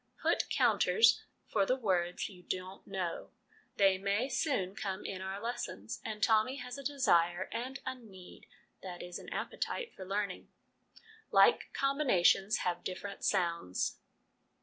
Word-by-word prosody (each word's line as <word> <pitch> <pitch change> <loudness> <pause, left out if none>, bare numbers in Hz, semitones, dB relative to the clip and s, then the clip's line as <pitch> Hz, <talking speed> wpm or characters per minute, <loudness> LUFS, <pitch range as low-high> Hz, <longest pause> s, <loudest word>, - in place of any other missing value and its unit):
' - - -27
Put - - +2
counters 450 - +4 0.2
for 205 - +1
the 250 +6 +2
words 180 -8 0
you 185 -3 -13
don't 185 +1 -5
know; 185 -3 -3 0.5
they 195 -1 +4
may 200 +6 0
soon 255 - 0
come 195 -1 -4
in 190 -1 -4
our 190 +1 -4
lessons/ 230 - -5
and 215 0 -4
Tommy 225 +3 +4
has 250 -1 -6
a - - -8
desire 180 -11 +2
and 255 +4 -4
a 260 - -1
need 200 -8 -14 0.3
that 180 -2 -7
is, 175 0 -6
an - - -10
appetite 475 -2 -3
for 190 - -9
learning. 200 0 -3 0.8
Like - - +5
Combinations 235 -8 +3
have 175 -1 -1
Different 190 +2 -6
Sounds. 170 - 0
195 Hz, 145 wpm, -33 LUFS, 185-245 Hz, 0.8 s, Like